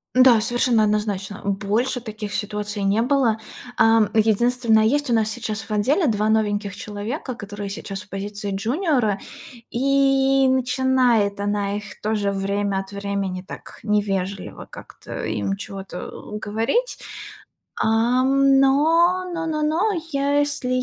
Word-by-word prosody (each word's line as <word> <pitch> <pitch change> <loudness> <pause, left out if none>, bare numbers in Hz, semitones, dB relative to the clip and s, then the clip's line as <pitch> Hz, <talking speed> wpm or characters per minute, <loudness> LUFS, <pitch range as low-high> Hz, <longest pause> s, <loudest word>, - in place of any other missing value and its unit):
Да, 255 -3 +6
совершенно 240 0 +2
однозначно, 210 -1 -1
больше 210 +6 -1
таких 215 -2 -6
ситуаций 210 0 -3
не 200 +3 +2
было. 245 -3 +2 0.4
Ам, 225 -2 +4
единственное, 225 +1 +3
есть 290 +4 +1
у - - +2
нас 220 -1 +2
сейчас 220 -2 -4
в - - -11
отделе 265 - +2
2 215 -2 +1
новеньких 205 -2 0
человека, 225 +5 -5
которые 205 -2 -7
сейчас 195 0 -6
в 210 - -16
позиции 205 +1 -5
джуниора, 240 - 0 0.5
и 270 +1 +3
начинает 250 -5 +2
она 205 0 -1
их 205 -2 -10
тоже, 210 -2 0
время 200 0 -1
от 195 0 -7
времени, 200 -2 -3
так - - -10
невежливо 200 -2 -2
как-то - - -9
им 110 - -2
чего-то 195 -2 -7 0.3
говорить. 225 - -1 0.8
Ам, 260 +5 +3
но 330 +7 +4
но 330 -1 -3
но 305 -1 -1
но, 330 +8 +1 0.2
я, 280 +1 +1
если 290 -3 -1
220 Hz, 130 wpm, -22 LUFS, 205-260 Hz, 0.8 s, Да